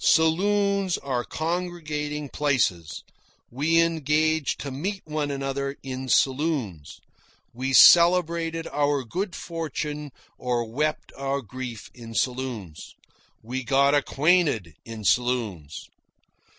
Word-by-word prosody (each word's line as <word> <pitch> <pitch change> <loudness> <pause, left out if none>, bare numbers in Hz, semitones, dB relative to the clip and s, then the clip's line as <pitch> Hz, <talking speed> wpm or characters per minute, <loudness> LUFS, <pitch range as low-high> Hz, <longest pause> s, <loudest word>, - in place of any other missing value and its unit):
Saloons 195 +3 +2
are 130 -3 -2
congregating 155 -3 -3
places. 125 - -1 0.5
We 155 +7 +2
engaged 155 -1 0
to 140 - -5
meet 190 +9 -4
one 150 -2 -2
another 140 0 -3
in 130 0 -5
saloons. 130 - 0 0.5
We 130 +3 -3
celebrated 170 0 +6
our 145 -1 0
good 180 - -4
fortune 150 -3 -5 0.3
or 120 -2 -1
wept 150 +7 -2
our 135 0 -2
grief 125 0 -8
in 115 -2 -10
saloons. 125 - -3 0.5
We 130 +4 -4
got 140 +2 +3
acquainted 145 - +2
in 115 -2 -8
saloons. 110 - -1
140 Hz, 100 wpm, -25 LUFS, 125-160 Hz, 0.5 s, celebrated